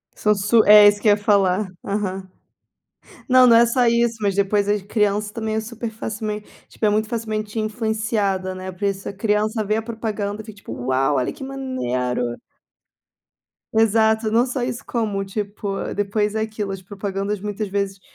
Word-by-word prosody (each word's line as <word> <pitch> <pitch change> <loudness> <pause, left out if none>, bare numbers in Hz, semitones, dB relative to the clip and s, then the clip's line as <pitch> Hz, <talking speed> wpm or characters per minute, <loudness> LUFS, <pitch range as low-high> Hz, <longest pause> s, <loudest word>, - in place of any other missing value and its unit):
São 210 0 +2
su 210 +3 +3
é 210 0 +9
isso 205 0 +3
que - - 0
eu - - +7
ia 205 - +4
falar. 200 -1 +2 0.2
Aham. 195 -2 -3 1.0
Não 255 -1 +6
não 235 - +7
é 235 - +6
só 245 +1 +2
isso, 235 0 +2
mas 200 -2 +1
depois 200 +1 +1
as 205 0 +1
crianças 210 0 0
também 220 -1 -3
é - - +1
super 230 +1 -5
facilmen 215 -1 -5 0.2
tipo - - -4
é - - +5
muito 215 +1 0
facilmente 215 -2 -3
influenciada, 215 -3 -1
né. 185 0 -6
Por 185 +2 -11
isso 195 -1 -2
a - - -7
criança 215 +2 0
vê 215 +1 0
a - - -1
propaganda, 220 -2 -4
fica 215 -1 -11
tipo: 205 - -8
"Uau! 130 +3 0
Olha 125 - -1
que 295 - -10
maneiro." 125 - -2 1.4
Exato, 220 0 +3
não 230 +3 +3
só 255 0 -3
isso, 245 0 -4
como 210 -4 -1
tipo, 200 0 -4
depois 205 +1 0
é 220 - 0
aquilo, 215 -2 -3
as 195 - -7
propagandas 200 +1 -4
muitas 210 +1 -4
vezes, 195 -1 -2
210 Hz, 180 wpm, -21 LUFS, 200-220 Hz, 1.4 s, é